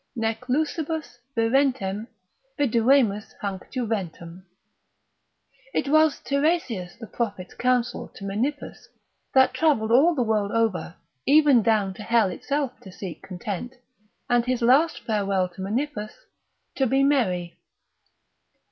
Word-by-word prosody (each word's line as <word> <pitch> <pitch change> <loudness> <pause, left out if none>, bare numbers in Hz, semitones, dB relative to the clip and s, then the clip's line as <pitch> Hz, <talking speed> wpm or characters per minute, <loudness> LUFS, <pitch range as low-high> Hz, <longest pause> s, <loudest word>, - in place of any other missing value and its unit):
Nec 225 -1 -1
lusibus 310 0 -2 0.2
virentem 225 -4 +1 0.5
Viduemus 235 -4 +2
hanc 195 -2 -5
juventam. 190 - -4 1.3
It - - 0
was 310 0 +4
Tiresias 280 - -1
the 230 - -7
prophet's 205 -4 -4
council 250 -1 0
to - - -10
Menippus, 245 +9 -3 0.5
that 260 -1 +5
travelled 275 -9 +2
all 305 +8 +5
the 255 - +1
world 210 -2 0
over, 195 -7 0 0.3
even 285 -4 +6
down 210 -3 +1
to 200 - -11
hell 220 -2 +2
itself 280 +7 -3
to 190 - -12
seek 180 -3 -8
content, 200 +6 -6 0.5
and 240 -1 +3
his 250 -1 0
last 280 +7 +4
farewell 200 -4 0
to 180 +1 -11
Menippus, 215 +2 -3 0.6
to 265 - +1
be 270 +3 +2
merry. 185 -12 +1
230 Hz, 120 wpm, -25 LUFS, 200-275 Hz, 1.3 s, even